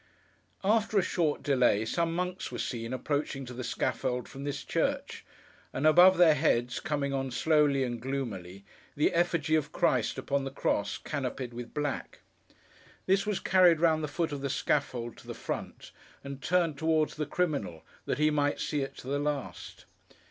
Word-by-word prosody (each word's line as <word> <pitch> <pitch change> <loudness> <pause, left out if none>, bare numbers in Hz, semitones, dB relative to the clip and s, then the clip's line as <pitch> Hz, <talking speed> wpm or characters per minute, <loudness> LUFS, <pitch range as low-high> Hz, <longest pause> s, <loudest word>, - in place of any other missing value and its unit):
After 215 +1 +2
a 195 - +4
short 165 -4 0
delay, 125 -6 +3
some 165 +7 0
monks 180 +1 -3
were - - -5
seen 115 -1 -4
approaching 135 +1 -2
to 125 - -8
the 125 +1 -5
scaffold 125 +1 -2
from 135 +1 -8
this 145 - -3
church; - - -2 0.5
and 135 - -1
above 175 +4 +7
their 170 -3 +7
heads, 125 -5 +1
coming 140 -2 -2
on 135 -1 -1
slowly 145 +1 +3
and 120 -2 -3
gloomily, 100 -8 -5 0.3
the 150 - +2
effigy 170 -3 +1
of 155 -2 +1
Christ 125 -6 +1
upon 140 0 -1
the 135 - -3
cross, 100 -6 -1
canopied 130 -4 -4
with 120 0 -8
black. 145 -2 -3 0.8
This 195 +2 +2
was 210 -3 0
carried 180 -4 +5
round 160 -2 +3
the - - -1
foot 165 +2 -2
of 145 -1 -4
the 140 - -2
scaffold, 125 -4 -1
to - - -15
the - - -6
front, - - -6 0.3
and 140 0 -7
turned 170 -2 +1
towards 160 -1 +2
the 150 -2 -3
criminal, 140 - -2 0.2
that - - 0
he 155 0 +3
might 145 -1 +1
see 150 -2 -1
it 135 - -5
to - - -10
the 140 +1 0
last. 145 -2 -4
145 Hz, 175 wpm, -29 LUFS, 130-160 Hz, 0.8 s, above